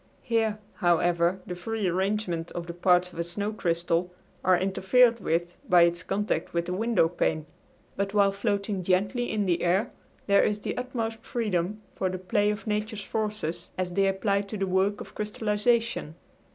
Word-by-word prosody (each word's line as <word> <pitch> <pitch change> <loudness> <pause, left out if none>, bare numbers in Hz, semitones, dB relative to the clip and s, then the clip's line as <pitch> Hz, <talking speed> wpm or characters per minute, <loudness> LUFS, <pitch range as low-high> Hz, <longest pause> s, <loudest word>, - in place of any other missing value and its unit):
Here, 225 -3 +1 0.2
however, 175 0 +2
the 180 - -5
free 210 +3 -2
arrangement 180 -2 -1
of 175 - -4
the 170 - -6
parts 180 0 +3
of - - -9
a - - +1
snow 200 +5 -3
crystal 170 -2 0 0.3
are 185 0 +5
interfered 230 +6 +3
with 175 0 -1
by 175 -1 +7
its 170 0 +2
contact 195 -3 -2
with 170 0 +1
the 180 - -3
window 220 -3 +2
pane, 160 -2 -1 0.5
but 200 0 -1
while 200 -1 +4
floating 200 -1 -1
gently 195 +7 +1
in 210 -2 0
the 175 -2 +1
air 190 +7 +1 0.3
there 200 -1 +5
is 210 0 0
the - - -3
utmost 230 -3 -3
freedom 210 -3 -2
for 190 - -1
the 185 - -3
play 205 +3 +1
of 210 +1 -3
nature's 210 0 -2
forces 210 -6 -3
as 185 -1 -2
they 195 +2 +2
apply 200 +1 +1
to 205 +1 -6
the 195 - 0
work 190 +2 +1
of - - -10
crystallization. 210 -3 0
195 Hz, 175 wpm, -27 LUFS, 175-210 Hz, 0.5 s, by